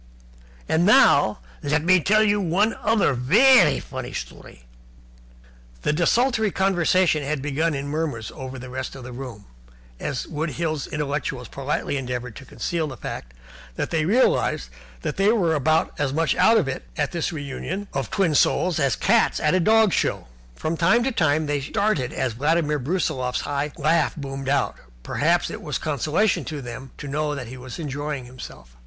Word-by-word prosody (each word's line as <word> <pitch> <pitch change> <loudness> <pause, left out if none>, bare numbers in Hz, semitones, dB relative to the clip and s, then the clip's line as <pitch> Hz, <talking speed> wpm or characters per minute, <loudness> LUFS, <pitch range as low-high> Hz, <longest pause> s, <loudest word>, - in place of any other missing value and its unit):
And 160 +2 +2
now 140 - +5 0.2
let 150 +1 0
me 185 +2 +5
tell 215 +6 +3
you 205 -1 +2
one 195 +5 +2
other 215 -8 +2
vairy 150 - +5
funny 130 -2 -7
story 60 - -8 0.7
" - - -26
Desultory 220 - +2
conversation 185 -3 +2
had 145 +1 -2
begun 150 +3 -1
in 140 +1 -4
murmurs 145 -7 -3
over 130 0 -7
the 130 0 -9
rest 130 +1 -5
of 130 - -9
the 125 - -8
room, 125 -5 -8 0.5
as 130 - -3
the - - -14
Wood 155 +1 -2
Hills 155 -4 -2
intellectuals 140 -4 -3
politely 140 +1 -2
endeavoured 125 -3 -4
to 140 - -11
conceal 165 +2 -3
the 130 -4 -8
fact - - -7 0.4
that - - -3
they 160 -2 +1
realized 190 - +2 0.3
that - - -3
they 195 +2 +4
were 180 -8 +2
about 155 +2 +1
as 145 -2 0
much 155 -1 +1
out 230 - +5
of - - +1
it 135 - -4
at 145 -1 0
this 170 -1 -2
re 155 -4 -5
union 185 +8 -5
of 135 -4 -2
twin 185 -6 +1
souls 175 +3 +2
as 140 -3 +2
cats 225 +3 +2
at 150 - +2
a 185 - +3
dog 220 +1 +4
show. - - 0 0.3
From 160 - -3
time 225 +9 +3
to 265 - 0
time 155 - +1
they 145 -1 -1
started 200 - 0
as 125 -3 -2
Vladimir 150 +4 +1
Brusiloff's 130 -4 -1 0.3
laugh 155 +2 +2
boomed 135 -2 -5
out. 140 -2 0 0.3
Perhaps - - +1
it - - -7
was - - -3
a - - -14
consolation 155 - +1
to 155 -2 -5
them 125 +1 -8
to 145 - -7
know 150 +1 -1
that 125 -5 -6
he 130 - -8
was 130 0 -9
enjoying 145 -3 -4
himself. 65 - -11
150 Hz, 180 wpm, -23 LUFS, 130-175 Hz, 0.7 s, now